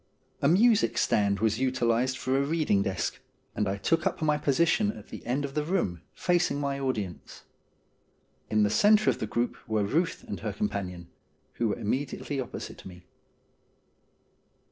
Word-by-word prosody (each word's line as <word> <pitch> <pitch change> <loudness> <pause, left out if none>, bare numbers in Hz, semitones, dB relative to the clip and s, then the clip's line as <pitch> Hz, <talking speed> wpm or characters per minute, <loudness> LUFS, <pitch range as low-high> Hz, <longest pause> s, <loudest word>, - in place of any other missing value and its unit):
A - - +3
music 185 - +4
stand 100 -1 +2
was 110 0 +1
utilised 130 -1 +1
for 130 +1 -1
a 135 - +3
reading 145 -8 +1
desk, 95 -2 -2 0.3
and 105 - -1
I 100 - -2
took 165 - +1
up - - -2
my 150 -1 +2
position 165 +8 +2
at - - -12
the - - -9
end 135 +4 0
of 135 - -7
the 150 - 0
room, 150 - -1
facing 175 -5 +1
my 140 -1 -2
audience. 105 - -4 1.1
In 110 0 +3
the 105 - +2
centre 210 - +5
of - - -6
the 110 - -2
group 120 +3 -1
were 110 -1 +1
Euth 165 - 0
and 100 - -6
her 105 -1 -3
companion, 90 -4 -3 0.5
who 115 - +2
were 105 - -1
immediately 135 +4 -2
opposite 125 - -6
me. 90 -1 -11
130 Hz, 165 wpm, -28 LUFS, 105-150 Hz, 1.1 s, centre